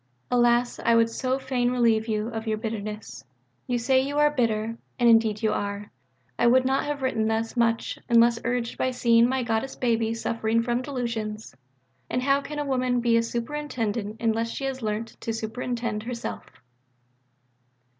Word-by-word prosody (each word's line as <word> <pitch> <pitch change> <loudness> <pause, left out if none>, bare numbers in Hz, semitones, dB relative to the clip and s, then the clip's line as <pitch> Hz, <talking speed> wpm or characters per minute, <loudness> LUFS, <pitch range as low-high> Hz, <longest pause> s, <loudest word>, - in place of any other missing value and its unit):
Alas, 240 0 +3
I 235 - +4
would 230 0 +3
so 260 +2 -1
fain 260 -2 0
relieve 230 -3 +2
you 215 0 -1
of 225 -1 -5
your 215 -1 0
"bitterness." 215 -1 -5 0.4
You 245 - 0
say 260 +2 +3
you 285 +2 -3
are 295 0 +4
"bitter"; 230 -4 -1 0.2
and 240 -2 +3
indeed 225 -2 +4
you 215 -1 +2
are.... 200 0 -4 0.5
I 240 - +4
would 255 +2 +5
not 265 +2 +1
have 290 -2 -3
written 225 -4 +1
thus 225 +2 -1
much, 230 -1 0
unless 235 0 +5
urged 235 0 -2
by 255 - +2
seeing 235 -1 +4
my 260 -1 0
Goddess 225 +3 -1
baby 230 -2 0
suffering 230 0 0
from 240 +1 0
delusions. 230 -5 -4 0.6
And 250 +1 -1
how 275 +1 +3
can 295 +2 -7
a 295 - -1
woman 255 -2 +1
be 235 -1 +2
a 230 - +4
Superintendent 230 -3 -3
unless 230 0 0
she 275 - -5
has 265 -1 -3
learnt 215 +1 -4
to 225 - -2
superintend 230 0 -3
herself? 235 +1 -5
235 Hz, 170 wpm, -26 LUFS, 225-250 Hz, 0.6 s, would